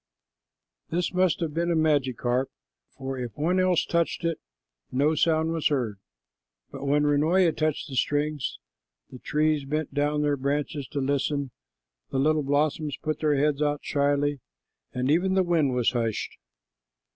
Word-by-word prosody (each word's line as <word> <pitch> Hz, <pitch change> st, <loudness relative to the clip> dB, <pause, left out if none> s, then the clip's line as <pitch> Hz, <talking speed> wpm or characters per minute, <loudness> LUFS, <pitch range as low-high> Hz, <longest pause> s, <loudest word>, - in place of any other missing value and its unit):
This 175 Hz, +1 st, -1 dB
must 185 Hz, -2 st, +2 dB
have 160 Hz, -3 st, -2 dB
been 170 Hz, +2 st, 0 dB
a 170 Hz, -, +2 dB
magic 145 Hz, -6 st, +1 dB
harp, 125 Hz, +2 st, +1 dB, 0.5 s
for 135 Hz, -1 st, -4 dB
if 120 Hz, -3 st, -6 dB
one 175 Hz, +5 st, +1 dB
else 185 Hz, -2 st, +2 dB
touched 170 Hz, 0 st, 0 dB
it, 165 Hz, -1 st, -1 dB, 0.5 s
no 145 Hz, +4 st, +2 dB
sound 160 Hz, +1 st, +2 dB
was 165 Hz, -2 st, +1 dB
heard, 120 Hz, -9 st, -1 dB, 0.7 s
but -, -, -7 dB
when 145 Hz, +1 st, +3 dB
Runoia 160 Hz, +4 st, +3 dB
touched 155 Hz, -1 st, -1 dB
the 135 Hz, -, -7 dB
strings, 145 Hz, +1 st, -1 dB, 0.5 s
the 125 Hz, -, -10 dB
trees 150 Hz, +1 st, +1 dB
bent 150 Hz, +1 st, -3 dB
down 150 Hz, +1 st, +1 dB
their 145 Hz, -1 st, +1 dB
branches 140 Hz, +1 st, -2 dB
to 145 Hz, -, -4 dB
listen, 140 Hz, 0 st, -1 dB, 0.6 s
the -, -, -2 dB
little 155 Hz, +3 st, +3 dB
blossoms 145 Hz, +1 st, 0 dB
put 155 Hz, 0 st, -3 dB
their 150 Hz, -2 st, +2 dB
heads 145 Hz, +1 st, +1 dB
out 145 Hz, -1 st, 0 dB
shyly, 145 Hz, 0 st, +1 dB, 0.5 s
and 125 Hz, +2 st, 0 dB
even 185 Hz, +4 st, +2 dB
the 190 Hz, -, +4 dB
wind 160 Hz, -7 st, +1 dB
was 125 Hz, -2 st, +2 dB
hushed. 115 Hz, -3 st, -2 dB
145 Hz, 155 wpm, -26 LUFS, 140-155 Hz, 0.7 s, the